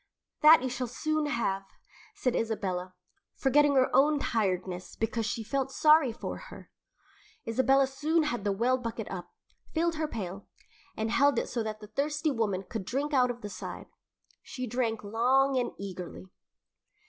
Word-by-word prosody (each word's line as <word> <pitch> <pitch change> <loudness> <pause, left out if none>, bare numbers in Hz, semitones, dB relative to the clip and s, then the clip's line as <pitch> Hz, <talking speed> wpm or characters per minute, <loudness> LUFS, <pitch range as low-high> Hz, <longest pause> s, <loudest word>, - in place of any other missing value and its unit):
"That 305 -3 +8
you 260 - -1
shall 250 0 -3
soon 310 +5 -1
have," 235 -8 0 0.5
said 255 -12 0
Isabella, 185 -5 -2 0.4
forgetting 285 +1 +3
her 260 -1 +3
own 295 +2 +5
tiredness 185 -7 -2
because 225 0 -1
she 225 - -3
felt 270 +3 -2
sorry 305 -3 +5
for 225 - -6
her. - - -12 0.8
Isabella 265 +4 +4
soon 305 +5 +1
had 240 -8 -2
the 205 - +1
well 245 +6 +1
bucket 230 -3 -5
up, 180 -2 -6 0.5
filled 335 0 +1
her 310 0 -1
pail, 195 -6 -6 0.5
and 220 +1 -1
then - - 0
held 280 -2 +4
it - - -1
so 240 - -2
that 215 -1 -4
the 210 - -9
thirsty 295 +6 -1
woman 210 -7 -1
could 215 +1 -5
drink 280 +9 -2
out 250 -2 +4
of 240 0 -5
the 205 - -6
side. - - -7 0.5
She 255 - -6
drank 230 -2 -1
long 255 +6 +2
and 250 -1 +1
eagerly. 185 -2 -7
245 Hz, 165 wpm, -29 LUFS, 215-275 Hz, 0.8 s, That